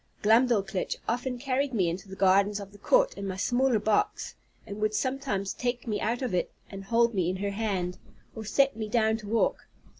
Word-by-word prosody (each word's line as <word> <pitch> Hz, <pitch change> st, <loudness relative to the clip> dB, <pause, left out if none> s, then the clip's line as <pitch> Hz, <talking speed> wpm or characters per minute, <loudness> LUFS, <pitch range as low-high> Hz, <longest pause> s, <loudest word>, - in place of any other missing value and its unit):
Glumdalclitch 215 Hz, -4 st, +2 dB
often 245 Hz, +2 st, -1 dB
carried 265 Hz, +1 st, -1 dB
me 185 Hz, -5 st, +2 dB
into 185 Hz, +4 st, -4 dB
the 190 Hz, -, -7 dB
gardens 200 Hz, +2 st, +3 dB
of 200 Hz, -1 st, -9 dB
the 205 Hz, -, -16 dB
court -, -, +3 dB
in 200 Hz, -, -6 dB
my 190 Hz, -, -3 dB
smaller 245 Hz, +5 st, +2 dB
box, 410 Hz, -, 0 dB, 0.3 s
and 200 Hz, +1 st, -7 dB
would 215 Hz, 0 st, +1 dB
sometimes 255 Hz, -8 st, -1 dB
take 245 Hz, -1 st, -3 dB
me 210 Hz, -3 st, -2 dB
out 240 Hz, +3 st, -1 dB
of 245 Hz, -, -2 dB
it, 180 Hz, -, 0 dB, 0.2 s
and 195 Hz, -1 st, -8 dB
hold 235 Hz, +2 st, +3 dB
me 180 Hz, -4 st, +1 dB
in 185 Hz, -, -1 dB
her 200 Hz, +1 st, -2 dB
hand, 195 Hz, -4 st, -2 dB, 0.4 s
or 220 Hz, -, -6 dB
set 270 Hz, +4 st, +2 dB
me 220 Hz, -1 st, -4 dB
down 220 Hz, -1 st, +2 dB
to 215 Hz, -2 st, -10 dB
walk. 225 Hz, +2 st, 0 dB
215 Hz, 205 wpm, -28 LUFS, 195-245 Hz, 0.4 s, gardens